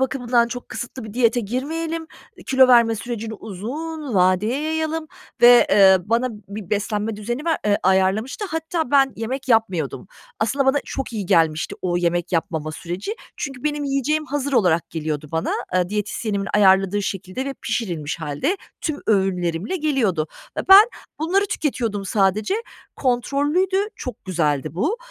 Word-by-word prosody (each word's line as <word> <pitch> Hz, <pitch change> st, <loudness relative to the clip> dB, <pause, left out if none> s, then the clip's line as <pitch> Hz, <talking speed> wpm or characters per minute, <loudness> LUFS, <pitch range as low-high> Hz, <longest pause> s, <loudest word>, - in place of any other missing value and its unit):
bakımından 245 Hz, -3 st, +1 dB
çok 245 Hz, 0 st, -7 dB
kısıtlı 245 Hz, 0 st, -6 dB
bir 215 Hz, -, -8 dB
diyete 240 Hz, -1 st, +3 dB
girmeyelim. 320 Hz, +9 st, -3 dB, 0.3 s
E, -, -, -13 dB
kilo 260 Hz, -1 st, +5 dB
verme 235 Hz, -2 st, +6 dB
sürecini 225 Hz, 0 st, -5 dB
uzun 260 Hz, -, -6 dB
vadeye 190 Hz, +8 st, +2 dB
yayalım." 315 Hz, 0 st, -2 dB, 0.4 s
ve, 240 Hz, 0 st, +8 dB
eee, 190 Hz, -2 st, +7 dB
bana 235 Hz, +3 st, +1 dB, 0.2 s
bir 200 Hz, -2 st, -8 dB
beslenme 210 Hz, +1 st, -1 dB
düzeni 240 Hz, +7 st, -4 dB
ver 330 Hz, -1 st, +1 dB
eee, 205 Hz, 0 st, +3 dB
ayarlamıştı 190 Hz, -, +1 dB
hatta 320 Hz, -3 st, -2 dB
ben 270 Hz, -2 st, +4 dB
yemek 255 Hz, +4 st, -4 dB
yapmıyordum. 195 Hz, -, +1 dB, 0.3 s
Aslında 265 Hz, +5 st, 0 dB
bana 280 Hz, +2 st, +4 dB
çok 270 Hz, -3 st, -5 dB
iyi 205 Hz, -4 st, -4 dB
gelmişti 165 Hz, -4 st, +2 dB
o 175 Hz, -1 st, 0 dB
yemek 175 Hz, 0 st, 0 dB
yapmama 160 Hz, -2 st, -1 dB
süreci. 180 Hz, -, -5 dB, 0.2 s
Çünkü 270 Hz, -1 st, -6 dB
benim 295 Hz, -1 st, -1 dB
yiyeceğim 280 Hz, +3 st, 0 dB
hazır 285 Hz, 0 st, -2 dB
olarak 170 Hz, -8 st, +2 dB
geliyordu 155 Hz, -2 st, -4 dB
bana, 160 Hz, 0 st, -1 dB, 0.2 s
aaa, 180 Hz, -1 st, +1 dB
diyetisyenimin 210 Hz, 0 st, -2 dB
ayarladığı 195 Hz, 0 st, +4 dB
şekilde 195 Hz, +6 st, -4 dB
ve 275 Hz, 0 st, -4 dB
pişirilmiş 175 Hz, -10 st, -3 dB
hâlde 160 Hz, -, -1 dB, 0.2 s
tüm 305 Hz, -2 st, -3 dB
öğünlerimle 190 Hz, -, 0 dB
geliyordu. 250 Hz, -, 0 dB, 0.3 s
E, -, -, +2 dB
ben 395 Hz, +2 st, +10 dB, 0.3 s
bunları 380 Hz, +6 st, +1 dB
tüketiyordum 235 Hz, -, -2 dB
sadece. 205 Hz, -, +1 dB, 0.4 s
Kontrollüydü, 290 Hz, +9 st, +1 dB, 0.2 s
çok 250 Hz, -4 st, -7 dB
güzeldi 150 Hz, -6 st, -1 dB
bu. 315 Hz, -, 0 dB
225 Hz, 145 wpm, -22 LUFS, 190-275 Hz, 0.4 s, ben